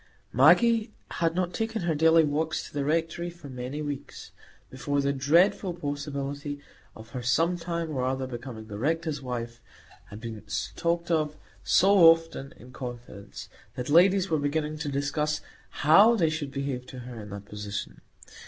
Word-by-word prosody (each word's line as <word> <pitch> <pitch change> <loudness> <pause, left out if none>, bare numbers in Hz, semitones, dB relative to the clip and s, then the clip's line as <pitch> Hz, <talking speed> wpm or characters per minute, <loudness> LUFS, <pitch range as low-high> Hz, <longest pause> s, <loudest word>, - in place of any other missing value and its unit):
Maggie 215 - +5 0.2
had 165 -1 0
not 180 -1 -1
taken 225 -2 -2
her 170 -1 +1
daily 160 +2 +5
walks 155 +2 -1
to - - -12
the 145 -1 -1
Rectory 165 +3 -1
for 170 -4 -12
many 130 +4 -5
weeks, 145 -2 -7 0.4
before 140 +2 -2
the 140 0 +1
dreadful 170 +6 +3
possibility 145 -1 -4 0.4
of 110 +1 -12
her 125 +1 -5
some 165 +9 +2
time 170 -1 -3
or 130 -4 -2
other 130 +1 -1
becoming 120 -3 -7
the 105 -1 -8
Rector's 160 +2 -1
wife 120 -2 -5 0.5
had 105 - -9
been 110 -2 -7 0.3
talked 170 0 -1
of 155 -2 +1 0.3
so 195 +2 +4
often 165 -4 -3
in 125 - -14
confidence, 120 -5 -8 0.3
that 125 - -4
ladies 185 +3 +5
were 160 -3 +1
beginning 150 +1 -2
to 150 -1 -3
discuss 145 +2 -1 0.4
how 200 +10 +7
they 165 -7 +2
should 155 -3 -3
behave 135 -3 -4
to 130 -1 -9
her 120 -2 -8
in 105 - -10
that 100 0 -8
position. 105 -11 -6
145 Hz, 160 wpm, -27 LUFS, 125-165 Hz, 0.5 s, how